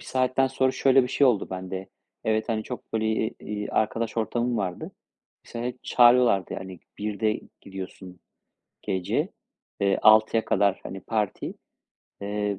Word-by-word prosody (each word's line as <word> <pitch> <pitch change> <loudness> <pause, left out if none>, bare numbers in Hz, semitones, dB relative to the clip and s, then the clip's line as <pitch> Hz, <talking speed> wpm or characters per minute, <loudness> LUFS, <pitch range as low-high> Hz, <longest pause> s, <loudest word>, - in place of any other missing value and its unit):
1 - - -13
saatten 130 +1 +1
sonra 130 0 +1
şöyle 135 0 +4
bir 125 - -2
şey 140 - +3
oldu 120 -6 +1
bende. 95 0 -5 0.4
Evet, 110 +1 0
hani, 110 -1 0
çok 125 - -8
böyle, 110 -1 0
eee, 110 +1 0
iii, 105 0 -5
arkadaş 115 +1 -1
ortamım 120 +2 0
vardı. 95 -4 -3 0.5
Mesela 120 +1 -5
hep 125 0 -7
çağırıyorlardı. 120 -5 +5
Yani, 95 -1 -7 0.2
1'de 105 +1 -1 0.2
gidiyorsun 95 -2 -9 0.6
gece, 95 -2 -1 0.5
eee, 100 -1 +2
6'ya 110 +1 +5
kadar, 100 0 +2
hani, 95 - -6
parti. 105 -1 -2 0.7
Eee, 105 -1 -2
110 Hz, 145 wpm, -26 LUFS, 95-120 Hz, 0.7 s, çağırıyorlardı